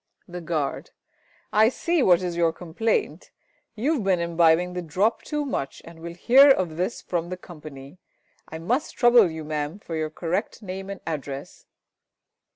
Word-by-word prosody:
The 180 -1 -7
Guard. 155 -4 -3 0.6
I 220 +1 +5
see 335 +5 0
what 185 -6 +4
is 175 -1 -3
your 170 -1 +2
complaint. 185 - -2 0.5
You 260 +9 +1
have 265 -9 -2
been 190 -2 +2
imbibing 170 +1 +3
the 180 - -3
drop 190 +8 0
too 295 -1 -3
much 140 - -4
and 165 0 -12
will 170 +1 -8
hear 265 +10 +6
of 185 -11 +2
this 180 +7 -3
from 170 -1 -2
the 185 - -5
Company. 155 -3 -12 0.5
I 160 - -6
must 235 - -2
trouble 240 -5 +6
you, 160 -1 -6
Mam, 150 +2 -3
for 175 -5 -7
your 155 -1 -2
correct 180 +8 -3
name 190 0 -6
and 200 - -7
address. 140 -3 -6
175 Hz, 165 wpm, -25 LUFS, 160-210 Hz, 0.6 s, hear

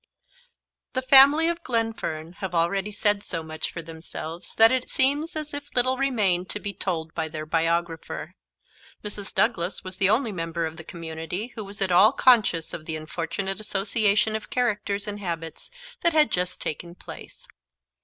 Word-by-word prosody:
THE 260 - -1
family 280 +5 +7
of 340 0 -1
Glenfern 225 - -2
have 190 -3 -4
already 190 +5 +1
said 205 0 +2
so 165 -5 -4
much 155 0 -5
for 170 - -6
themselves 165 +1 -7
that 225 0 +7
it 260 -1 0
seems 290 +6 +2
as 305 -1 -4
if 285 0 -5
little 255 +1 +3
remained 210 -9 +1
to 210 - -2
be 205 -1 -5
told 165 -4 -3
by 160 -1 -2
their 155 -1 -6
biographer. 165 0 -1 0.7
Mrs. 205 -1 -5
Douglas 190 -5 0
was 185 0 -8
the 195 - +4
only 225 +2 +2
member 165 -2 -2
of 160 0 -6
the 160 - -9
community 165 +6 -5
who 215 - -6
was 200 0 -4
at 190 - 0
all 205 +7 +6
conscious 220 - +3
of 155 - -6
the 160 - -3
unfortunate 170 +5 -4
association 210 +1 +1
of 220 - -5
characters 210 -5 -1
and 205 0 -4
habits 165 -4 -5 0.3
that 340 - +3
had 305 -1 +5
just 180 0 -1
taken 170 +3 -5
place. - - -11
195 Hz, 170 wpm, -25 LUFS, 165-225 Hz, 0.7 s, family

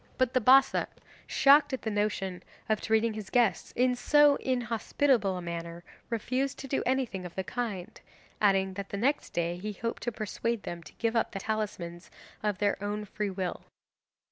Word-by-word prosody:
But 255 -1 +1
the 255 - +3
Bassa, 265 +4 +5 0.4
shocked 285 +1 +5
at 260 - -3
the 220 - -1
notion 205 -3 -1 0.3
of 215 -1 +1
treating 220 0 +2
his 215 -2 -7
guests 230 -8 +2
in 250 +1 +3
so 295 +3 +5
inhospitable 240 -3 +1
a 180 - -6
manner, 170 0 -6 0.3
refused 255 +4 -1
to 270 - -7
do 270 - 0
anything 255 -8 0
of 175 -1 -8
the 190 - -2
kind, 205 -5 -5 0.4
adding 195 -2 +3
that 200 +1 -6
the 200 - -4
next 270 +8 0
day 170 0 -1
he 210 +3 -5
hoped 230 +4 -4
to 240 - -2
persuade 225 +1 -3
them 170 0 -6
to - - -14
give 230 -1 -1
the 230 - +3
talismans 190 -5 -4 0.3
up 210 -2 0
of - - -24
their 205 0 0
own 210 +1 -3
free 210 0 -3
will. 185 -2 -3
215 Hz, 180 wpm, -29 LUFS, 190-245 Hz, 0.4 s, Bassa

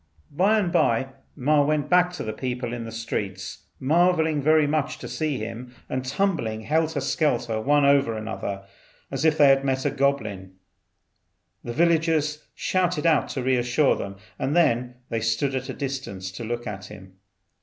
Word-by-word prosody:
By 195 +9 +3
and 190 -5 0
by 120 -1 +2 0.3
Ma 145 +2 +3
went 150 0 0
back, 180 0 +4
the 110 -11 -4
people 125 -2 -4
in 120 -1 -5
the 115 - -7
streets 100 -4 -5
marvelling 160 +1 +2
very 155 +1 +4
much 155 +1 -1
to - - -8
see 155 -4 -2
him, 115 +3 -7
and 130 0 -3
tumbling 130 - -1
helter 160 +4 0
skelter 125 -6 0
one 145 +4 +3
over 140 -5 +3
another 100 -2 -5 0.5
as 135 +2 -2
if 160 -1 +3
they 145 -2 +7
had 135 0 +4
met 130 -1 -1
a - - +2
goblin. 105 -9 -1 1.1
The 120 - -5
villagers 160 -1 +2
shouted 180 -4 0
out 155 -7 +3
to 130 - -3
re 130 +1 +2
assure 120 +4 +2
them, 100 0 -6 0.2
and 135 +4 -1
then 125 -7 +2
they 115 -1 -2
stood 115 +5 0
at 130 0 -3
a - - -3
distance 130 -9 -5
to 95 +5 -7
look 120 +1 -4
at 105 -3 -6
him. 95 -1 -13
135 Hz, 170 wpm, -25 LUFS, 115-155 Hz, 1.1 s, they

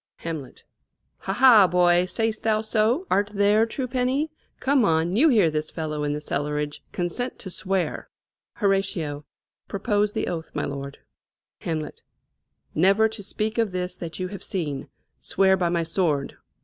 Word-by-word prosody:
Hamlet. 160 -6 -7 0.6
Ha, 195 - -3
ha, 230 -4 +7
boy! 175 0 +4
say'st 220 +4 -2
thou 215 -1 +1
so? 220 - +1
art 205 +1 +2
there, 205 +3 +4
true 255 +2 -3
penny? 260 +5 0 0.3
Come 270 -1 +3
on 165 -1 +2
you 305 +8 +5
hear 205 - +4
this 155 0 -2
fellow 155 -2 -3
in 145 - 0
the 150 - -2
cellarage, 150 0 -2
Consent 180 +9 -3
to 190 - -8
swear. 190 0 -2 0.5
Hor. 195 -8 0 0.4
Propose 205 +1 0
the - - -1
oath, 165 -2 -4
my - - -1
lord. 140 0 -6 0.6
Hamlet. 155 -2 -4 0.7
Never 195 +7 +4
to 220 -1 -8
speak 215 +3 -2
of 225 -4 +1
this 180 0 -3
that 170 -1 -7
you 185 0 -2
have 200 -2 -8
seen, 150 -8 -2 0.3
Swear 190 - +3
by 180 -2 0
my 170 -1 +1
sword." 160 -4 -1
190 Hz, 155 wpm, -24 LUFS, 160-215 Hz, 0.7 s, ha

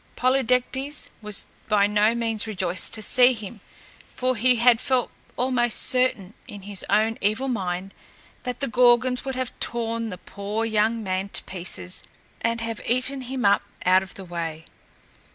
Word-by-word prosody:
Polydectes 260 +2 0
was 210 -2 -3 0.2
by 205 -2 +4
no 210 +2 +3
means 225 -2 -1
rejoiced 185 -4 -1
to 220 - -2
see 250 +4 +5
him, 215 -2 -9 0.5
for 255 0 -1
he 250 +3 +3
had 235 0 +4
felt 255 -2 0 0.3
almost 245 -2 +2
certain, 250 -7 +3
in 205 -2 -10
his 200 -1 -3
own 220 +1 +2
evil 215 +7 0
mind, 190 -5 -3 0.5
that 250 +2 -5
the 275 - 0
Gorgons 245 +1 +3
would 265 -1 -3
have 255 -2 -3
torn 230 -1 -1
the 180 - -6
poor 205 +5 -4
young 220 +1 +1
man 190 0 -2
to - - -2
pieces 180 0 -3 0.4
and 230 0 0
have 230 -1 -4
eaten 255 +3 +2
him 255 -2 -3
up 200 0 +5 0.2
out 185 +1 +5
of 190 - -10
the 190 - -9
way. 165 -2 -5
225 Hz, 160 wpm, -24 LUFS, 200-250 Hz, 0.5 s, see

